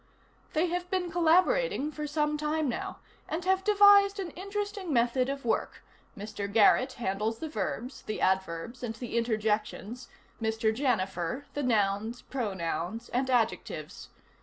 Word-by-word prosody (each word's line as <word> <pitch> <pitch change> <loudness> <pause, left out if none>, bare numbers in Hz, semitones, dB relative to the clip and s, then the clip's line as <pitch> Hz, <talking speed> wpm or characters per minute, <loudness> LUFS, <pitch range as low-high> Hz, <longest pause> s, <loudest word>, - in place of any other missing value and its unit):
They 320 +2 +2
have 355 +1 -3
been 360 -2 -1
collaborating 350 - +3
for 300 0 -5
some 300 0 0
time 305 0 0
now, 245 - -3 0.3
and 340 +3 -3
have 380 0 +2
devised 405 -1 +6
an 370 -3 -4
interesting 400 -1 -4
method 250 +1 +2
of 275 -2 -4
work: 225 - -1 0.3
Mr. 200 -1 -5
Garrett 230 +5 +5
handles 215 +1 -2
the 320 - -5
verbs, 240 +1 -4
the 215 - -5
adverbs 190 +4 -1
and 230 -2 -4
the 235 0 -6
interjections, 220 +1 -1 0.3
Mr. 220 0 +1
Janifer 205 - -1
the 290 - -2
nouns, 220 -1 0
pronouns, 190 - -3
and 260 +2 0
adjectives. 245 -3 -1
250 Hz, 135 wpm, -29 LUFS, 220-330 Hz, 0.3 s, devised